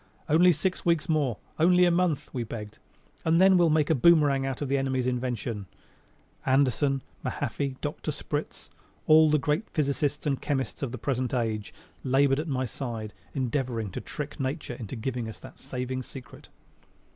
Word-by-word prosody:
"Only 175 Hz, +4 st, +6 dB
six 175 Hz, +4 st, -1 dB
weeks 170 Hz, -3 st, +2 dB
more, 145 Hz, -8 st, +1 dB, 0.2 s
only 180 Hz, +2 st, +5 dB
a 175 Hz, -, +4 dB
month," 170 Hz, -4 st, 0 dB
we 125 Hz, -3 st, -2 dB
begged, 105 Hz, -2 st, -7 dB, 0.4 s
"and 165 Hz, +1 st, +3 dB
then 190 Hz, 0 st, +7 dB
we'll 175 Hz, -2 st, +5 dB
make 155 Hz, 0 st, +2 dB
a -, -, +6 dB
boomerang 145 Hz, -2 st, +4 dB
out 135 Hz, -1 st, -3 dB
of 145 Hz, -, -2 dB
the 140 Hz, +1 st, +1 dB
enemy's 130 Hz, -2 st, 0 dB
invention." 120 Hz, -5 st, -2 dB, 0.8 s
Anderson, 135 Hz, +1 st, +2 dB, 0.2 s
Mahaffey, 140 Hz, 0 st, -2 dB
Dr. 145 Hz, +1 st, -4 dB
Spritz 150 Hz, 0 st, -4 dB, 0.3 s
all 155 Hz, 0 st, +7 dB
the 150 Hz, -, +4 dB
great 150 Hz, +7 st, -1 dB
physicists 145 Hz, -1 st, -1 dB
and 140 Hz, -3 st, 0 dB
chemists 135 Hz, -5 st, -2 dB
of 135 Hz, -4 st, -2 dB
the 130 Hz, -, -5 dB
present 130 Hz, +1 st, -1 dB
age 110 Hz, -4 st, -2 dB, 0.3 s
labored 135 Hz, +1 st, +3 dB
at 160 Hz, -, -3 dB
my 130 Hz, -3 st, -1 dB
side 115 Hz, -3 st, -5 dB, 0.2 s
endeavoring 125 Hz, -5 st, -1 dB
to -, -, -5 dB
trick 150 Hz, +1 st, -6 dB
Nature 135 Hz, 0 st, -3 dB
into 120 Hz, 0 st, -7 dB
giving 120 Hz, 0 st, -3 dB
us 110 Hz, -, -9 dB
that -, -, -13 dB
saving 130 Hz, 0 st, -4 dB
secret. 130 Hz, 0 st, -11 dB
135 Hz, 170 wpm, -27 LUFS, 125-155 Hz, 0.8 s, then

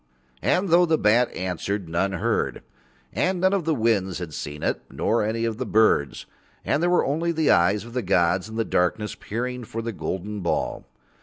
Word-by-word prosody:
And 185 Hz, +1 st, +1 dB
though 175 Hz, +1 st, +5 dB
the 160 Hz, -1 st, +3 dB
bat 120 Hz, +2 st, +3 dB
answered 95 Hz, +1 st, -3 dB
none 90 Hz, +4 st, 0 dB
heard. 95 Hz, -, -1 dB, 0.5 s
And 185 Hz, 0 st, 0 dB
none 190 Hz, +2 st, +3 dB
of 190 Hz, -5 st, 0 dB
the 160 Hz, -2 st, +1 dB
winds 105 Hz, -6 st, +1 dB
had 85 Hz, -4 st, -6 dB
seen 75 Hz, 0 st, -6 dB
it -, -, 0 dB
nor 95 Hz, +11 st, 0 dB
any 115 Hz, +2 st, -1 dB
of 115 Hz, -2 st, -2 dB
the -, -, 0 dB
birds, 105 Hz, -10 st, +2 dB, 0.4 s
and 145 Hz, -, +1 dB
there 175 Hz, -, +2 dB
were 180 Hz, -, +3 dB
only 165 Hz, +5 st, 0 dB
the 160 Hz, -2 st, +2 dB
eyes 95 Hz, +5 st, +3 dB
of 120 Hz, -, -11 dB
the 125 Hz, -, -1 dB
gods 90 Hz, 0 st, +1 dB
in 110 Hz, -, -8 dB
the 115 Hz, 0 st, 0 dB
darkness 105 Hz, +4 st, 0 dB
peering 125 Hz, +3 st, -4 dB
for 115 Hz, 0 st, -5 dB
the 115 Hz, -, -3 dB
golden 105 Hz, +1 st, -4 dB
ball. 85 Hz, -3 st, -2 dB
110 Hz, 200 wpm, -24 LUFS, 95-130 Hz, 0.5 s, though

